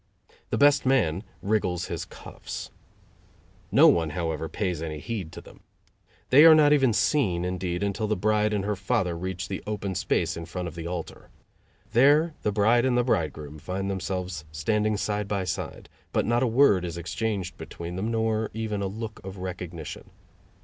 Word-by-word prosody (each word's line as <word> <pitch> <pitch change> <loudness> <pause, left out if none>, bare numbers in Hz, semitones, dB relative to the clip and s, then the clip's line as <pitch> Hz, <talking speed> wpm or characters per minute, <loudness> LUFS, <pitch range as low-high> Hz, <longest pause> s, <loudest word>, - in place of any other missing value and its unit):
The - - 0
best 145 0 +5
man 100 -11 +2 0.2
wriggles 90 -4 0
his - - -4
cuffs. - - -8 1.0
No - - +7
one, 80 -2 +3
however, 80 -1 -3
pays 90 -6 -2
any 80 -2 -4
heed 95 -1 -5
to - - -8
them. - - -16 0.7
They 140 +4 +8
are 160 -1 +10
not 150 -1 +6
even 135 -4 +4
seen, 100 - +1
indeed, 90 0 -2
until 100 +2 -1
the 110 - +1
bride 105 +2 +1
and 100 -2 -1
her 105 0 0
father 95 -2 0
reach 95 +2 -4
the 95 - -4
open 100 -2 -3
space 90 -3 0
in 85 -1 -7
front 90 +1 -4
of 85 - -7
the 85 0 -6
altar. 85 -2 -6 0.6
There 145 +7 +5
the 105 - 0
bride 110 +4 +3
and 130 -2 +2
the 125 - +3
bridegroom 75 - -2
find 95 +5 -3
themselves 90 -3 -3
standing 105 +7 0
side 105 0 -2
by 100 -2 -1
side, 90 - -5 0.2
but - - +1
not 120 +2 +2
a 130 - +3
word 115 -6 +4
is 85 -1 -4
exchanged 95 +1 -3
between 85 +1 -7
them, 100 +5 -2
nor 110 -1 0
even 110 -2 -2
a 100 - -1
look 110 +2 -7
of 95 +1 -8
recognition. 90 -4 -7
100 Hz, 175 wpm, -26 LUFS, 85-110 Hz, 1.0 s, are